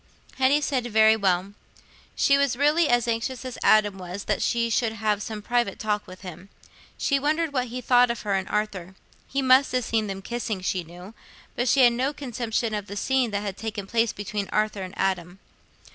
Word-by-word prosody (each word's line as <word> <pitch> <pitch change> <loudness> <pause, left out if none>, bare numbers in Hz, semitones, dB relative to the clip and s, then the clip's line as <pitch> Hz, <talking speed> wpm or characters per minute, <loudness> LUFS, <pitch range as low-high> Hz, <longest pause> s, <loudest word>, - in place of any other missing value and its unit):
Hetty 270 +3 +4
said, 260 -4 -1
"Very 220 -1 +5
well." 195 -2 0 0.6
She 275 - +4
was 280 -3 +1
really 300 +3 +3
as 240 -1 +2
anxious 235 +3 -2
as 255 -1 -6
Adam 205 -2 +4
was 185 +2 -6
that - - -1
she 235 -1 +1
should 225 0 +1
have 210 -1 -1
some 215 -1 -6
private 240 -4 0
talk 210 -1 -2
with 185 0 -12
him. 180 +1 -10 0.5
She 280 -1 +1
wondered 310 +2 0
what 255 -2 0
he 250 +2 -6
thought 245 0 +4
of 235 - -3
her 205 -2 -1
and 190 -1 -1
Arthur. 195 -4 -3 0.3
He 275 0 -2
must 260 0 +5
have 250 -2 0
seen 220 -2 0
them 195 -1 -6
kissing, 230 -4 -4
she 185 -1 -1
knew, 180 +5 -12 0.4
but 245 - -1
she 265 +2 +4
had 240 -1 +6
no 260 +4 -1
conception 235 -4 -3
of 205 -1 -3
the 200 - -7
scene 265 +1 +1
that 205 -1 -3
had 200 -2 -5
taken 215 -3 -5
place 230 +2 +1
between 205 0 -4
Arthur 215 -1 0
and 185 +1 -7
Adam. 185 -2 -1
220 Hz, 205 wpm, -25 LUFS, 200-250 Hz, 0.6 s, had